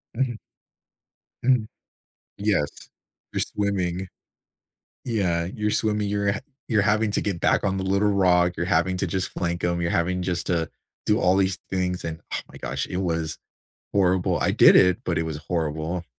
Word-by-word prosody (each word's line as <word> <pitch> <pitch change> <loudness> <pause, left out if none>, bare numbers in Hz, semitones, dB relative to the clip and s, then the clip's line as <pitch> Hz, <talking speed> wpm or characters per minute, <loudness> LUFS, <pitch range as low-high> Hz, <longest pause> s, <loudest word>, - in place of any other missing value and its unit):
Mhm. 125 -1 0 1.1
Mhm. 125 -3 +3 0.7
Yes. 100 -8 -1 0.4
You're - - 0
swimming. 95 -3 -1 1.0
Yeah, 90 -8 0
you're 105 +4 -2
swimming. 105 -1 +1
You're 100 0 +1
ha 105 - -4 0.3
you're 110 -3 +3
having 105 +1 +2
to 105 - 0
get 95 -5 -2
back - - +2
on 95 -1 +1
the 95 - -2
little 100 +2 +2
rock. 90 -2 +3
You're 85 - -1
having 90 +1 +2
to 95 - 0
just 95 +2 -1
flank 85 -1 -2
'em. 85 0 0
You're 85 - 0
having 90 +2 0
just 90 -1 -2
to 80 -3 0 0.3
do 105 - +2
all 90 +1 +4
these 95 -2 +1
things, 90 -1 -1
and, 80 0 -4
oh - - -1
my - - -13
gosh, 70 +2 -3
it 90 - -3
was 80 -4 -1 0.6
horrible. 95 -2 +2
I - - +2
did - - +7
it, 90 -1 +5
but - - -1
it - - +1
was 80 -2 -4
horrible. 80 +1 -2
90 Hz, 175 wpm, -24 LUFS, 85-100 Hz, 1.1 s, did